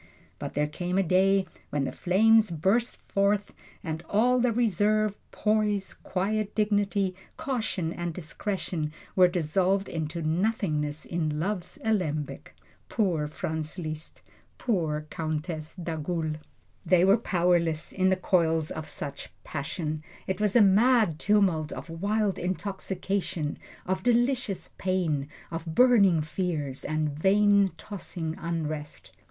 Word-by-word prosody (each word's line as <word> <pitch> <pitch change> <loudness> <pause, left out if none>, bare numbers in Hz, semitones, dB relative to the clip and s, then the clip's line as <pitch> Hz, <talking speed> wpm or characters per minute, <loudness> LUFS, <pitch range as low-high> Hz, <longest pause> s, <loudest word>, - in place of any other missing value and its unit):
But - - -6
there 150 +1 +2
came 175 +5 -3
a 195 - +4
day 190 +2 +3 0.2
when 145 -1 0
the - - -2
flames 220 +4 +4
burst 195 +9 +1
forth, 200 +1 +1 0.3
and 160 -1 -3
all 245 +5 +3
the 245 0 +3
reserve, 215 -2 +2 0.2
poise, 210 -2 0
quiet 205 +3 -2
dignity, 205 -2 +1 0.2
caution 220 -10 -2
and 175 0 -3
discretion 165 -1 -3 0.2
were 185 -1 +7
dissolved 185 +3 +1
into 160 0 -3
nothingness 155 -4 0
in 155 -3 -1
love's 185 +1 -3
alembic. 165 -10 -2 0.3
Poor 175 -9 +1
Franz 155 +2 -4
Liszt! 155 -2 -6 0.3
Poor 160 -10 -1
Countess 155 0 -4
d'Agoult! 160 -2 -3 0.5
They 180 0 +4
were 195 +1 +6
powerless 175 -6 +1
in 185 0 +2
the 190 - +4
coils 165 -4 +1
of 155 -1 -5
such 140 -1 -5
a - - -25
passion. 155 +1 -4 0.2
It 190 +2 -2
was 210 0 +1
a 235 - +8
mad 210 -4 +4
tumult 190 -7 +2
of 165 - -7
wild 200 +4 0
intoxication, 190 -3 -2 0.3
of 185 0 -1
delicious 240 -2 +1
pain, 170 -7 0 0.2
of 165 0 -5
burning 200 -10 +5
fears, 155 -5 -3
and 155 0 0
vain, 200 +5 +4
tossing 170 -5 -5
unrest. 155 -3 -4
180 Hz, 125 wpm, -28 LUFS, 155-205 Hz, 0.5 s, a